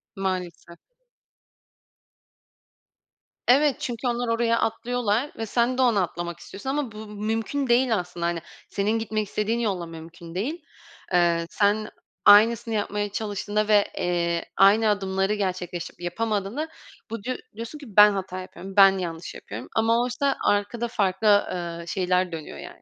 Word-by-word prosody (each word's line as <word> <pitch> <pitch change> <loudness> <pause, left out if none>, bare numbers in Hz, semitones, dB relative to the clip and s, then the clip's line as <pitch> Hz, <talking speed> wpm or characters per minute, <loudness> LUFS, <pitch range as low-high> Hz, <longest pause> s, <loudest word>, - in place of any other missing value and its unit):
Maalesef. 180 -3 -4 2.7
Evet, 275 +2 +5
çünkü 245 +1 -3
onlar 240 0 -1
oraya 230 0 +2
atlıyorlar 240 +2 0
ve 225 - -3
sen 240 +3 +1
de - - +2
ona 230 -6 +4
atlamak 175 0 -5
istiyorsun 205 +10 -8
ama 275 -4 -1
bu 215 0 -9
mümkün 225 +6 -2
değil 240 -1 +3
aslında. 175 -2 -4
Hani, 170 -1 -1 0.3
senin 210 +3 0
gitmek 215 -1 -2
istediğin 215 +3 -1
yolla 195 -7 -1
mümkün 165 +1 -11
değil. 295 - -3 0.5
Eee, 170 -1 +3
sen 210 +1 +1 0.4
aynısını 225 +2 +6
yapmaya 205 0 -1
çalıştığında 210 0 -2
ve, 205 -1 +5
eee, 170 -1 0
aynı 210 +3 +6
adımları 195 0 0
gerçekleştirip 180 -4 -4
yapamadığında, 210 - -2 0.4
bu 225 -2 -6
diyo 255 0 -2 0.2
diyorsun 230 +7 -7
ki, 290 - -11
"Ben 210 0 +7
hata 190 -1 -4
yapıyorum, 190 +1 -10
ben 195 -1 +7
yanlış 170 -2 -5
yapıyorum." 110 +5 -8
ama 230 +1 +3
oysa 260 +3 0
arkada 205 +4 +1
farklı, 200 -2 0 0.2
ııı, 170 -1 -5
şeyler 180 0 0
dönüyor, 160 -2 -7
yani. - - -11
205 Hz, 140 wpm, -25 LUFS, 180-230 Hz, 2.7 s, Ben